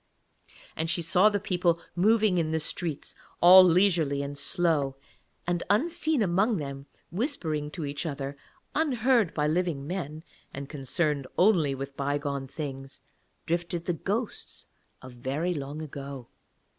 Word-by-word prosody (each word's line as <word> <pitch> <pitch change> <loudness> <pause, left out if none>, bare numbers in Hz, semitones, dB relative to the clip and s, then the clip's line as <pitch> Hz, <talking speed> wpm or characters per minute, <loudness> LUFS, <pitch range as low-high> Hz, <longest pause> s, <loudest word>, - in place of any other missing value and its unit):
And 160 +1 -2
she 170 0 0
saw 185 +5 +5
the 205 -1 -1
people 180 -4 +1 0.2
moving 210 0 +3
in 160 -2 0
the 160 0 0
streets 155 -1 -3 0.3
all 185 +2 +10
leisurely 170 -6 +3
and 140 0 -5
slow, 145 -2 0 0.5
and 175 0 0
unseen 315 - +2
among 195 +4 +2
them, 140 -2 -6 0.2
whispering 165 - -2
to 160 0 -5
each 145 +4 -4
other, 140 -1 -4 0.4
unheard 250 - +2
by 150 - +1
living 160 -3 0
men 155 -2 -5 0.3
and 140 0 -6
concerned 145 0 -1
only 175 -8 +4
with 135 +1 -6
bygone 140 -1 -2
things, 135 -2 -7 0.5
drifted 170 0 -2
the 175 - 0
ghosts 210 +7 -4 0.4
of 130 - -9
very 140 +9 -2
long 145 0 -5
ago. 140 -4 -8
160 Hz, 135 wpm, -28 LUFS, 140-185 Hz, 0.5 s, all